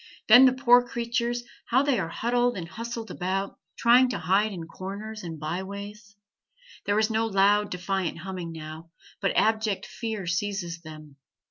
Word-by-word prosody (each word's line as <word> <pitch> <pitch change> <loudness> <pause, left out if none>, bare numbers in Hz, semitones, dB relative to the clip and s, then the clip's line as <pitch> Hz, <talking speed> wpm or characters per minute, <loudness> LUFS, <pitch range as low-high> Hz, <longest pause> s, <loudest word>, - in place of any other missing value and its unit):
Then 245 +4 +9
the 255 - +5
poor 245 -2 +5
creatures, 240 0 -2 0.2
how 260 +3 +3
they 280 -3 +1
are 165 - -2
huddled 245 +2 0
and 170 -2 -5
hustled 230 +3 -6
about, 190 +2 -3 0.2
trying 250 +2 +5
to - - -2
hide 195 +6 +2
in 170 -4 -6
corners 200 +5 -7
and 165 -3 -7
by 160 +5 -3
ways. 200 +1 -9 0.7
There 205 0 +2
is 215 +1 +2
no 225 +1 +1
loud, 205 0 +3
defiant 180 -1 -2
humming 180 -1 -6
now, 160 +1 -9 0.3
but 195 - 0
abject 220 -2 +1
fear 220 -4 -5
seizes 180 -2 -2
them. 155 -3 -12
205 Hz, 160 wpm, -26 LUFS, 180-230 Hz, 0.7 s, Then